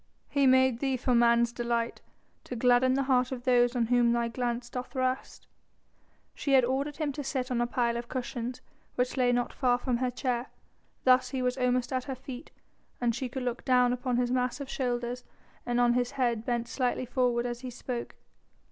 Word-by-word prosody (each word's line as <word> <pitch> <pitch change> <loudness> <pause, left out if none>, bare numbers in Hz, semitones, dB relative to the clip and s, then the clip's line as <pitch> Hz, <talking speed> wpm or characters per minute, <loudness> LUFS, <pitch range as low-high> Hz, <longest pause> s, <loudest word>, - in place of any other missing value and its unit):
"He 280 -1 +3
made 260 -2 +4
thee 270 -1 0
for 250 +1 0
man's 235 0 +4
delight, 235 -1 -2 0.4
to 250 - -6
gladden 250 +2 +4
the 275 - +1
heart 255 -1 +2
of 250 -2 -5
those 245 -1 +3
on 240 -2 +2
whom 240 0 +3
thy 235 0 0
glance 240 0 -2
doth 250 +1 -7
rest." 255 0 -2 0.9
She 280 - -1
had 260 -2 +6
ordered 275 +3 -2
him 305 -3 -1
to 290 +1 -5
sit 260 -1 -3
on 240 -1 +1
a 240 - +1
pile 235 -1 0
of 235 0 -6
cushions 250 -1 -4 0.3
which 250 0 0
lay 250 -2 +3
not 245 0 0
far 245 -3 +2
from 245 -1 -1
her 255 +1 0
chair. 245 0 -2 0.6
Thus 255 0 +4
was 250 -1 0
he 260 - -3
almost 250 0 +1
at 255 -1 -1
her 270 - -4
feet, 260 +2 -9 0.5
and 240 -1 +1
she 255 +2 -3
could 260 +1 -4
look 245 0 -3
down 250 -1 +4
upon 250 0 -1
his 245 0 +1
massive 255 +2 -1
shoulders 245 -1 -2 0.4
and 240 0 +1
on 240 0 +4
his 245 0 +1
head 235 -4 0
bent 240 -1 -1
slightly 255 +1 -1
forward 245 -1 +1
as 240 -1 -3
he 255 0 -6
spoke. 245 0 -5
250 Hz, 200 wpm, -29 LUFS, 240-255 Hz, 0.9 s, had